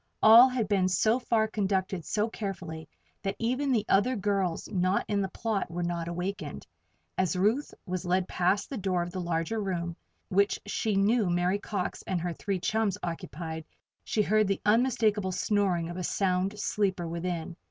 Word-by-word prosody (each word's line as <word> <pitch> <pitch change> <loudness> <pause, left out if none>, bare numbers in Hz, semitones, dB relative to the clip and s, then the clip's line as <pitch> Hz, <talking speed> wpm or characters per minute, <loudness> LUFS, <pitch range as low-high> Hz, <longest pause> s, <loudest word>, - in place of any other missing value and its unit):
All 230 +4 +9
had 250 -5 -1
been 195 -3 +2
so 220 +6 +2
far 225 -3 +1
conducted 190 -4 -1
so 210 +1 0
carefully 180 -8 -6 0.3
that 195 0 -2
even 255 +4 0
the 220 -4 +2
other 235 +7 +3
girls 195 -4 -1
not 185 -1 +1
in 205 -1 +1
the 190 - -1
plot 215 -2 -2
were 175 +1 -3
not 170 -1 -2
awakened. 180 +4 -4 0.5
As 185 -3 +1
Ruth 215 +10 +1
was 185 -2 -3
led 180 0 +1
past 185 +6 0
the 265 - -3
door 185 -3 0
of 175 - -6
the 185 0 -4
larger 170 +5 -1
room, 175 -4 -2 0.3
which 200 +1 +2
she 210 0 -1
knew 205 +1 +3
Mary 175 +3 +1
Cox 200 -3 -3
and 185 - 0
her 175 0 -2
three 195 +2 -2
chums 215 0 0
occupied, 165 -1 -5 0.4
she 215 - +1
heard 215 0 +3
the 195 -1 0
unmistakable 215 -3 +2
snoring 185 -3 +1
of 175 +1 -6
a 180 - -3
sound 190 +2 0
sleeper 190 -5 0
within. 170 0 -3
195 Hz, 175 wpm, -29 LUFS, 175-210 Hz, 0.5 s, All